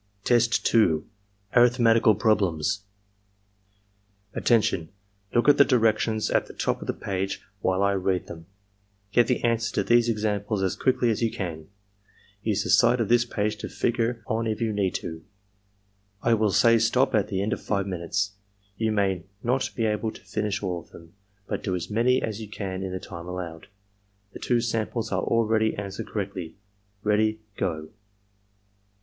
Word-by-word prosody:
Test 120 -1 +2
2. 80 -9 +3 0.2
— 100 0 -39
^Arifhmetical 115 -3 +5
Problems 105 -3 +1 1.5
"Attention! 105 -8 +1 0.5
Look 120 - +3
at 145 - +7
the - - +8
directions 110 -3 +1
at - - +1
the - - -12
top - - -1
of - - -7
the - - 0
page 95 0 -3 0.2
while 95 +1 +1
I 100 - +3
read 95 -1 0
them. 80 -1 -10 0.6
'Get 120 +2 +4
the 125 - 0
answers 115 -1 +1
to - - +1
these 120 0 +4
examples 105 -2 -1
as 95 - 0
quickly 125 -2 +2
as 110 - -2
you 115 - +2
can. 80 -7 -5 0.7
Use - - 0
the - - -1
side 125 - +5
of 115 - 0
this 120 0 +4
page 105 -2 -2
to - - -6
figure 120 -1 -1
on 115 +1 -1
if 110 -1 -2
you 115 -2 0
need 100 -3 0
to.' 80 -1 -5 1.0
I 115 - +3
will 110 -1 +2
say 115 +3 +5
stop 125 +4 +2
at 105 -3 +2
the 95 -2 -1
end 105 - 0
of - - -5
five 100 -2 -1
minutes. 95 +2 -2 0.5
You 110 -1 0
may 95 -4 0 0.2
not 125 +2 +1
be 115 - 0
able 110 +1 0
to - - -13
finish 105 -1 -2
all 90 -3 -2
of 85 - -17
them, 85 0 -15 0.3
but - - -3
do 95 -3 -2
as 90 +3 -5
many 120 +4 +2
as 110 0 -3
you 110 - -8
can 95 -3 -5
in 95 -1 -4
the 95 - -4
time 85 -2 -9
allowed. 90 -2 -6 0.7
The - - -8
two 120 -1 +1
samples 115 0 -2
are - - 0
already 110 -1 +1
an 100 -1 -5
swered 95 - -6
correctly. 95 -5 -5 0.2
— 100 0 -41
Ready 110 +1 +1
— 100 - -41
Go!" 80 -2 -3
105 Hz, 180 wpm, -26 LUFS, 95-115 Hz, 1.5 s, the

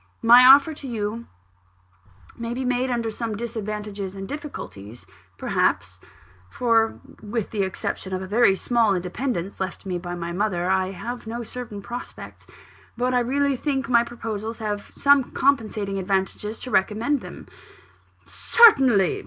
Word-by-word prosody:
My 240 +2 +8
offer 275 +4 +7
to 285 -2 -9
you 225 -1 -4 1.1
may 235 0 -5
be 260 +1 -3
made 250 +1 0
under 235 -2 -1
some 225 0 -4
disadvantages 210 -4 -5
and 195 0 -6
difficulties, 120 - -8 0.3
perhaps; - - 0 0.5
for, 225 - +1 0.2
with 215 0 -4
the 210 - -1
exception 190 0 -3
of 185 - -2
a 190 - -6
very 205 0 +3
small 225 -1 +2
independence, 185 +1 -3
left 190 0 -5
me 180 -2 -3
by 175 0 -6
my 170 0 -5
mother, 180 -1 -1
I 190 0 +1
have 235 +5 -7
no 235 +2 -4
certain 220 -4 -7
prospects. 240 +3 -9 0.5
But 250 +1 0
I 250 - +3
really 275 +3 +1
think 270 -1 -2
my 235 -1 +5
proposals 225 -2 -5
have 210 -2 -4
some 280 -1 +4
compensating 215 -7 0
advantages 195 +3 -2
to 255 - -7
recommend 225 +9 +1
them - - -10 0.5
" - - -36
"Certainly! 265 - +4
225 Hz, 145 wpm, -23 LUFS, 195-250 Hz, 1.1 s, My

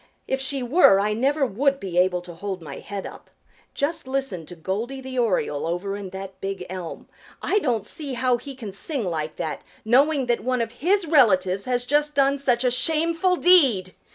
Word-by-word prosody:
If 265 0 -1
she 265 -1 +1
were 245 - +5
I 210 +1 +1
never 275 +6 +1
would 275 +5 +1
be 180 -2 -1
able 180 -1 +2
to 175 -1 -10
hold 190 +2 -5
my 155 - -8
head 200 -1 -6
up. - - -11 0.5
Just 285 -1 -2
listen 260 - -3
to 175 - -9
Goldy 210 +10 -4
the 260 -1 -5
Oriole 180 -10 0
over 180 +4 -2
in 200 -2 -6
that 190 0 -9
big 195 -2 -4
elm. 180 -3 -7 0.3
I 415 - +1
don't 240 - -1
see 295 -5 -5
how 250 0 +2
he 270 +3 -9
can 225 -6 -7
sing 245 - -4
like 155 -3 -3
that, 155 - -4 0.2
knowing 275 +4 +3
that 240 -1 0
one 255 -1 0
of 225 - -6
his 385 +3 +2
relatives 200 - +3
has 245 -1 -1
just 295 +2 +1
done 275 0 +3
such 255 -3 +1
a 250 - +2
shameful 330 +6 +1
deed. 270 - +4
245 Hz, 195 wpm, -24 LUFS, 190-275 Hz, 0.5 s, were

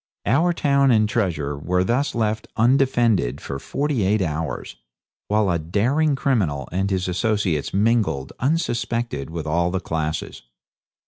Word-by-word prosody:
Our 155 - +3
town 140 -4 +2
and 110 -3 +4
treasure 85 -10 -1
were 90 +6 0
thus 125 +8 0
left 110 -1 -1
undefended 120 - +2
for 70 -1 -6
forty 140 - -1
eight 100 +1 +2
hours, 80 -5 -4 0.5
while 105 -2 +2
a 85 - 0
daring 125 - +1
criminal 90 - 0
and 95 +3 0
his 95 -2 -1
associates 90 -4 0
mingled 105 - +1
unsuspected 120 - -1
with 80 -1 -5
all 85 +4 0
classes. 80 -3 -3
100 Hz, 130 wpm, -22 LUFS, 80-120 Hz, 0.5 s, and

